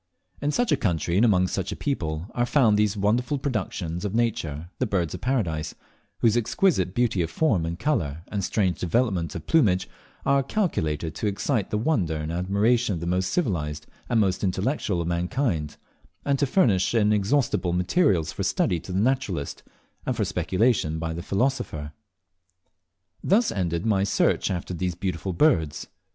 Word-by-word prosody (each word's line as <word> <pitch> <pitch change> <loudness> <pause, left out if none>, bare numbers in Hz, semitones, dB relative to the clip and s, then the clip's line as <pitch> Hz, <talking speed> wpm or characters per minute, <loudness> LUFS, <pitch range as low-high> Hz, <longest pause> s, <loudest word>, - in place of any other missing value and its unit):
In 145 - 0
such 240 +7 +1
a 150 - +4
country, 85 - 0
and 105 - +4
among 95 -6 +4
such 95 0 -3
a - - -3
people, 80 - -2
are 120 0 0
found 120 -8 +4
these 105 0 +1
wonderful 120 +8 +1
productions 105 - -3
of 105 0 -2
Nature, 85 -9 -1
the 130 - +1
Birds 90 -6 -1
of - - -6
Paradise, 85 - -1 0.5
whose 115 -2 +4
exquisite 115 - +1
beauty 120 -6 +1
of 80 - -1
form 100 - +1
and 85 +1 -4
colour 85 - -1
and 100 -2 -2
strange 95 -2 0
developments 90 - 0
of - - -6
plumage 105 - +3 0.4
are 140 0 +4
calculated 80 - -1
to 110 - -2
excite 105 +2 -1
the 105 - -1
wonder 105 - 0
and 75 +1 -3
admiration 100 +6 +1
of - - -4
the 85 - -5
most 90 +1 0
civilized 80 - -1 0.2
and 120 - +2
the 110 - +4
most 95 +1 -1
intellectual 95 - 0
of 85 - -3
mankind, 85 - -1 0.5
and 140 -1 +1
to 140 - +2
furnish 115 - +2
inexhaustible 105 -1 +2
materials 90 - +2
for - - -6
study 85 - +1
to 95 - -9
the 90 - 0
naturalist, 105 - -1 0.5
and - - 0
for - - +1
speculation 95 -6 +1
to 80 0 -3
the 85 - -5
philosopher. 95 - -1 1.3
Thus 215 +5 +3
ended 85 -2 -1
my 100 -3 +2
search 100 - +1
after 90 0 -3
these 90 0 -2
beautiful 90 +1 -3
birds. 85 - +2
95 Hz, 170 wpm, -25 LUFS, 85-120 Hz, 1.3 s, a